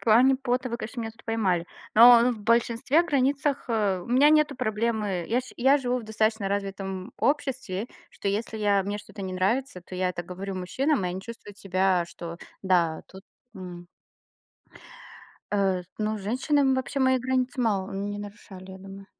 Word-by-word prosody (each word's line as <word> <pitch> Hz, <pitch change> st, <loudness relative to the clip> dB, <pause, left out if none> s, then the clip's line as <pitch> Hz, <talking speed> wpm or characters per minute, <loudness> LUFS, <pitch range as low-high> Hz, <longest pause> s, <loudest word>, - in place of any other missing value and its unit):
плане 245 Hz, +4 st, +5 dB
пота 255 Hz, -1 st, -1 dB
вы, 235 Hz, -, -3 dB
конечно, 235 Hz, +3 st, -6 dB
меня 225 Hz, -1 st, -4 dB
тут 225 Hz, -, -21 dB
поймали. 190 Hz, -7 st, 0 dB, 0.3 s
Но 235 Hz, +1 st, +9 dB
но 250 Hz, -, +3 dB
в 215 Hz, -, -9 dB
большинстве 235 Hz, +7 st, +2 dB
границах, 280 Hz, -2 st, 0 dB
а, 205 Hz, -6 st, 0 dB
у -, -, -12 dB
меня 265 Hz, +5 st, +5 dB
нету 305 Hz, -3 st, +3 dB
проблемы. 215 Hz, -5 st, -1 dB
Я 245 Hz, +3 st, +2 dB
ш 255 Hz, -, -12 dB
я 270 Hz, +3 st, +5 dB
живу 250 Hz, -2 st, -1 dB
в -, -, -7 dB
достаточно 215 Hz, -1 st, 0 dB
развитом 195 Hz, 0 st, -4 dB
обществе, 260 Hz, -8 st, -1 dB, 0.2 s
что -, -, -8 dB
если 220 Hz, +2 st, -2 dB
я 205 Hz, -2 st, +2 dB
мне 200 Hz, +2 st, -3 dB
что-то 205 Hz, 0 st, -11 dB
не 185 Hz, -1 st, -4 dB
нравится, 200 Hz, +2 st, -1 dB
то 185 Hz, -, -11 dB
я 185 Hz, 0 st, 0 dB
это 175 Hz, -1 st, -4 dB
говорю 190 Hz, +3 st, -6 dB
мужчинам, 255 Hz, -, 0 dB
и 180 Hz, -, 0 dB
они 185 Hz, +1 st, -4 dB
чувствуют 205 Hz, -1 st, -11 dB
себя, 185 Hz, -2 st, +1 dB
что, 170 Hz, 0 st, -8 dB, 0.2 s
да, 175 Hz, -4 st, +2 dB
тут 190 Hz, 0 st, -13 dB, 0.3 s
м 175 Hz, -2 st, -9 dB, 1.7 s
А 195 Hz, -3 st, +1 dB
с 175 Hz, -, -22 dB
ну, 215 Hz, 0 st, -1 dB
женщины 265 Hz, +6 st, +1 dB
вообще 260 Hz, +1 st, -2 dB
мои 260 Hz, 0 st, +4 dB
границы 255 Hz, +1 st, -1 dB
мало 200 Hz, -4 st, 0 dB
не 205 Hz, +1 st, -4 dB
нарушали, 200 Hz, -2 st, -10 dB
я 190 Hz, -, -10 dB
думаю. 195 Hz, +1 st, -11 dB
215 Hz, 180 wpm, -26 LUFS, 190-250 Hz, 1.7 s, Но